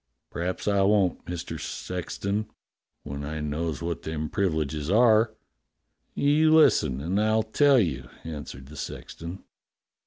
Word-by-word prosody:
"P'raps 90 Hz, +4 st, -3 dB
I 100 Hz, -1 st, +3 dB
won't, 95 Hz, -2 st, +2 dB
IVIister 90 Hz, -1 st, -5 dB
Sexton, 100 Hz, +4 st, -3 dB, 0.5 s
when 70 Hz, +1 st, -6 dB
I 75 Hz, +2 st, -4 dB
knows 75 Hz, +2 st, -3 dB
what 85 Hz, -1 st, -3 dB
them 80 Hz, -1 st, -4 dB
privileges 80 Hz, -5 st, -1 dB
are." 110 Hz, +1 st, +4 dB, 0.8 s
"You 155 Hz, +2 st, +4 dB
listen 65 Hz, -, +4 dB
and 95 Hz, +7 st, 0 dB
I'll 110 Hz, +1 st, +2 dB
tell 140 Hz, +5 st, +4 dB
you," 70 Hz, -, 0 dB
answered 75 Hz, -4 st, -7 dB
the 75 Hz, -, -11 dB
sexton. 85 Hz, +3 st, -7 dB
90 Hz, 125 wpm, -26 LUFS, 80-110 Hz, 0.8 s, are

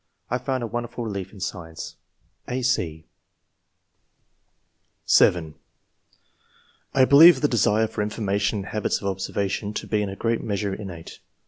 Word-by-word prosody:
I 125 Hz, -, 0 dB
found 130 Hz, -2 st, -2 dB
a -, -, -1 dB
won 120 Hz, +1 st, -3 dB
derful 120 Hz, 0 st, -6 dB
relief 100 Hz, -4 st, -5 dB
in 105 Hz, -, -13 dB
science." 85 Hz, -4 st, -6 dB, 0.5 s
(a, 130 Hz, +1 st, -3 dB
c) 80 Hz, -11 st, -1 dB, 2.0 s
(7) 80 Hz, -3 st, +4 dB, 0.7 s
" -, -, -36 dB
I 130 Hz, -1 st, +6 dB
believe 160 Hz, +6 st, +8 dB
the 145 Hz, -, +3 dB
desire 110 Hz, -3 st, +2 dB
for 105 Hz, -, -4 dB
information 105 Hz, 0 st, -1 dB
and 100 Hz, -, -5 dB
habits 105 Hz, -1 st, -1 dB
of -, -, -9 dB
observation 100 Hz, +2 st, -3 dB
to -, -, -4 dB
be 105 Hz, -1 st, 0 dB
in 100 Hz, -, -2 dB
a 95 Hz, -, -6 dB
great 115 Hz, +2 st, -1 dB
measure 100 Hz, -2 st, -2 dB
innate. 95 Hz, -5 st, -8 dB
105 Hz, 150 wpm, -24 LUFS, 95-120 Hz, 2.0 s, believe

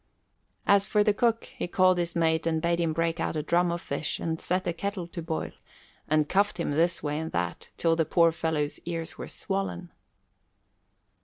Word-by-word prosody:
As 200 Hz, 0 st, +4 dB
for 210 Hz, -1 st, +3 dB
the 210 Hz, -, +3 dB
cook, 230 Hz, +2 st, +1 dB
he -, -, -3 dB
called 185 Hz, 0 st, +4 dB
his 170 Hz, 0 st, -2 dB
mate 160 Hz, -1 st, +2 dB
and 160 Hz, -1 st, +1 dB
bade 170 Hz, +1 st, +1 dB
him 165 Hz, -2 st, +1 dB
break 165 Hz, +1 st, 0 dB
out 165 Hz, -, -1 dB
a 155 Hz, -, -1 dB
drum 175 Hz, +2 st, +2 dB
of 170 Hz, 0 st, -3 dB
fish 140 Hz, +2 st, -3 dB
and 160 Hz, -1 st, -3 dB
set 185 Hz, +2 st, -1 dB
a 175 Hz, -, 0 dB
kettle 195 Hz, +1 st, -3 dB
to 170 Hz, 0 st, -7 dB
boil, 160 Hz, 0 st, -3 dB, 0.6 s
and 155 Hz, -1 st, +2 dB
cuffed 200 Hz, +2 st, +1 dB
him 170 Hz, -, -1 dB
this 170 Hz, +4 st, +2 dB
way 150 Hz, 0 st, -1 dB
and 160 Hz, 0 st, -4 dB
that, 90 Hz, -1 st, -2 dB
till 165 Hz, -1 st, +2 dB
the 165 Hz, -, +2 dB
poor 165 Hz, +1 st, +4 dB
fellow's 160 Hz, -3 st, -1 dB
ears 165 Hz, -1 st, -5 dB
were -, -, -5 dB
swollen. 195 Hz, -3 st, -3 dB
170 Hz, 200 wpm, -28 LUFS, 160-180 Hz, 0.6 s, As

